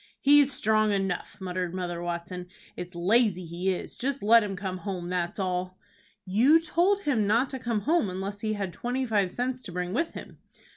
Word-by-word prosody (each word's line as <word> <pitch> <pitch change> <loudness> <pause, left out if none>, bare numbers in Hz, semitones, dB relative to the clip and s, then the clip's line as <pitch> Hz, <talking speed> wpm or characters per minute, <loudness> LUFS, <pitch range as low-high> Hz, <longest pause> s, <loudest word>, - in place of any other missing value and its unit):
"He's 285 0 +5
strong 215 -3 +2
enough," 195 -3 -2
muttered 180 -1 -3
Mother 175 -2 -3
Watson. 175 +1 -5 0.3
"It's 180 0 -7
lazy 185 0 +2
he 175 +3 -1
is. 180 - -5
Just 275 0 -2
let 230 +2 +6
him 200 -2 -3
come 190 -1 -4
home, 180 -3 -5
that's 175 -1 -2
all!" 185 -1 -2 0.5
"You 240 - +5
told 355 +5 +1
him 240 - +1
not 235 +6 +2
to 265 - -4
come 235 -4 -1
home 310 - +2
unless 195 +2 -5
he 215 -1 -1
had 195 -4 -3
twenty 250 +2 -2
five 205 -5 +1
cents 250 +5 -3
to 190 - -8
bring 180 +1 -3
with 330 +8 -1
him." - - -10
200 Hz, 190 wpm, -27 LUFS, 180-245 Hz, 0.5 s, let